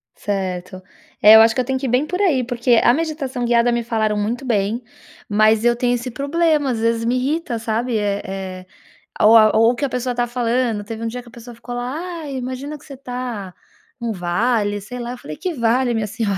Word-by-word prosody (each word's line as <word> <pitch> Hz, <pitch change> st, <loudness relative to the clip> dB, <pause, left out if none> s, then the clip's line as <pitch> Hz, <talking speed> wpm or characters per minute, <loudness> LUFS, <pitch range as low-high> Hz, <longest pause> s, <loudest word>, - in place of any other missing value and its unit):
Certo. 185 Hz, -2 st, -4 dB, 0.4 s
É, 215 Hz, +2 st, +9 dB
eu 220 Hz, -, +10 dB
acho 225 Hz, 0 st, +4 dB
que 255 Hz, -, +2 dB
eu -, -, -4 dB
tenho 265 Hz, +1 st, -1 dB
que 270 Hz, -, -4 dB
ir -, -, -1 dB
bem 250 Hz, +5 st, +2 dB
por 360 Hz, +5 st, -3 dB
aí 290 Hz, -10 st, +2 dB
porque, 240 Hz, -1 st, +2 dB
a 240 Hz, -, +5 dB
meditação 285 Hz, -5 st, -2 dB
guiada 240 Hz, 0 st, +3 dB
me 235 Hz, 0 st, 0 dB
falaram 220 Hz, -2 st, 0 dB
muito 230 Hz, +5 st, -2 dB
bem, 225 Hz, 0 st, 0 dB, 0.4 s
mas 215 Hz, +2 st, +3 dB
eu 240 Hz, 0 st, +4 dB
tenho 245 Hz, 0 st, +1 dB
esse 245 Hz, +1 st, -5 dB
problema, 295 Hz, 0 st, +1 dB
às 230 Hz, -, -2 dB
vezes 230 Hz, 0 st, 0 dB
me 240 Hz, +2 st, +1 dB
irrita, 265 Hz, 0 st, -1 dB
sabe, 225 Hz, +1 st, -1 dB
eh, 205 Hz, -1 st, -1 dB
eh, 190 Hz, -1 st, -6 dB, 0.6 s
ou 220 Hz, +2 st, +7 dB
a 215 Hz, -1 st, +5 dB
ou 225 Hz, +2 st, +5 dB
o -, -, -4 dB
que 280 Hz, -, -1 dB
a -, -, -2 dB
pessoa 250 Hz, 0 st, -2 dB
tá 240 Hz, 0 st, 0 dB
falando, 240 Hz, -2 st, -1 dB
teve 225 Hz, +2 st, -7 dB
um -, -, -1 dB
dia 245 Hz, +2 st, -5 dB
que 240 Hz, -, -15 dB
a -, -, -19 dB
pessoa 235 Hz, 0 st, -11 dB
ficou 245 Hz, +1 st, -8 dB
lá: 245 Hz, +1 st, -3 dB, 0.3 s
"Ai, 280 Hz, -3 st, -6 dB
imagina 260 Hz, +4 st, -5 dB
que 295 Hz, -, -19 dB
você 280 Hz, -, -10 dB
tá 245 Hz, -7 st, -6 dB, 0.5 s
num 235 Hz, -1 st, -2 dB
vale", 205 Hz, +3 st, 0 dB
sei 245 Hz, +5 st, -8 dB
lá, 240 Hz, 0 st, -5 dB
eu 250 Hz, -, -7 dB
falei: 155 Hz, -9 st, -9 dB
"Que 365 Hz, -, -3 dB
vale 240 Hz, -1 st, +1 dB
minha 220 Hz, -2 st, -1 dB
senhora, 205 Hz, -2 st, -2 dB
235 Hz, 235 wpm, -20 LUFS, 215-255 Hz, 0.6 s, eu